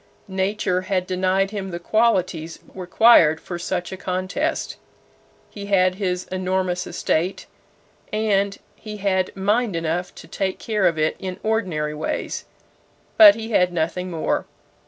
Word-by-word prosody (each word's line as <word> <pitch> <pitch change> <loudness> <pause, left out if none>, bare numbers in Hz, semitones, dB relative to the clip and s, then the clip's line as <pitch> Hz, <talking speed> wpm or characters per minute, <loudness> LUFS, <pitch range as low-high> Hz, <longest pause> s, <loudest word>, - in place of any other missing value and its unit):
Nature 190 -1 -1
had 185 -1 -1
denied 185 +1 0
him 200 -2 -4
the 170 - -4
qualities 180 -5 0 0.2
required 180 -4 +5
for 175 -1 -7
such 180 +1 -3
a 190 - -6
contest. 185 - -2 0.7
He 200 -1 -8
had 185 -2 +3
his 180 -1 -1
enormous 185 -1 -1
estate, 175 +2 -1 0.7
and 200 -2 +1 0.2
he 215 -1 -8
had 190 -2 0
mind 205 +1 +1
enough 165 +2 -2
to - - -12
take 190 -1 -2
care 210 -4 +1
of 165 -2 0
it 155 0 +1
in 185 -1 -5
ordinary 180 -9 -1
ways; 150 +1 -4 0.7
but 315 -2 +10
he 225 0 -6
had 180 -4 +3
nothing 175 +2 -2
more. 165 -3 -1
185 Hz, 135 wpm, -22 LUFS, 180-200 Hz, 0.7 s, but